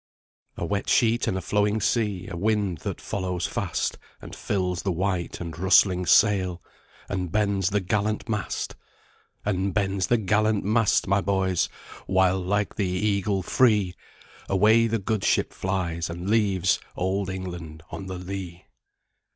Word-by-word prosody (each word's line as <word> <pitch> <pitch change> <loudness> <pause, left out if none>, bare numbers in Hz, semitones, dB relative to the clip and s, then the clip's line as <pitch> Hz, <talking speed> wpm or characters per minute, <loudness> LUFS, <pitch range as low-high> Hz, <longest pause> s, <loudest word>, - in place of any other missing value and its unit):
"A - - -2
wet 100 +4 -2
sheet 115 0 +3
and 95 - 0
a - - -3
flowing 105 +3 +1
sea, 105 -3 0
A 95 - -6
wind 100 -2 0
that - - -5
follows 90 -1 -3
fast - - -2 0.2
And - - -10
fills 90 -3 -1
the 95 - -1
white 90 0 -2
and 85 -2 -6
rustling 95 -1 +4
sail, 95 -4 +4 0.5
And 90 -3 -3
bends 100 -2 +1
the 105 0 0
gallant 105 +3 -1
mast! 105 -4 -3 0.7
And 95 -1 -1
bends 95 -2 0
the 120 - +3
gallant 110 0 +1
mast, 110 +1 +2
my 100 +1 +2
boys, 95 -2 +1 0.4
While, 95 0 +3
like 100 +3 -1
the 100 -4 0
eagle 100 +1 0
free, 105 -5 +3 0.6
Away 110 +4 +4
the 115 0 0
good 105 -1 -2
ship - - +1
flies, 85 -3 -2
and 85 +2 -6
leaves 100 -4 +2 0.2
Old 95 +1 -1
England 85 -4 -6
on 95 - -6
the 95 -1 -5
lee." 90 -1 -7
95 Hz, 150 wpm, -25 LUFS, 90-105 Hz, 0.7 s, rustling